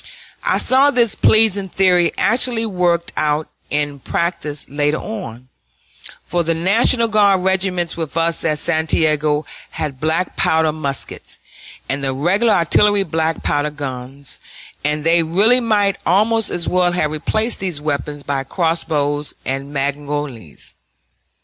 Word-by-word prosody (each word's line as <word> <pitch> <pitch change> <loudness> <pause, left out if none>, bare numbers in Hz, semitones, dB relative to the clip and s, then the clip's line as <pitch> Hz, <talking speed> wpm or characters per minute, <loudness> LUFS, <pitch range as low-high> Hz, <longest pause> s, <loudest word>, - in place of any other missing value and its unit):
I - - +2
saw 270 +2 +4
this 240 -6 +1
pleasing 205 -3 +3
theory 180 -2 +3
actually 235 0 +1
worked 175 -4 0
out 150 0 0 0.2
in 145 -1 -2
practice 155 -1 -2
later 145 +2 0
on, 130 - -7 0.8
for 175 -1 -1
the 165 0 0
National 225 +7 +3
Guard 205 -3 +3
regiments 185 -2 0
with 165 -1 -5
us 165 0 +1
at 155 -2 0
Santiago 155 -2 +1 0.2
had 140 -4 -5
black 160 +4 -1
powder 160 -1 +2
muskets, 140 -3 -6 0.5
and 140 0 -3
the 135 -1 -1
regular 195 - +2
artillery 200 +3 +3
black 160 -2 -2
powder 145 +1 0
guns, 135 -2 -7 0.4
and 150 +1 -1
they 165 +1 +4
really 200 +10 +3
might 205 -4 +1
almost 215 +4 +2
as 170 -1 -1
well 180 -1 +2
have 155 -4 0
replaced 215 +9 -1
these 180 -6 -3
weapons 145 -1 -3
by 140 -1 -2
crossbows 150 -2 -1
and 135 +1 -3
mangonels. 140 - -4
165 Hz, 130 wpm, -18 LUFS, 145-195 Hz, 0.8 s, saw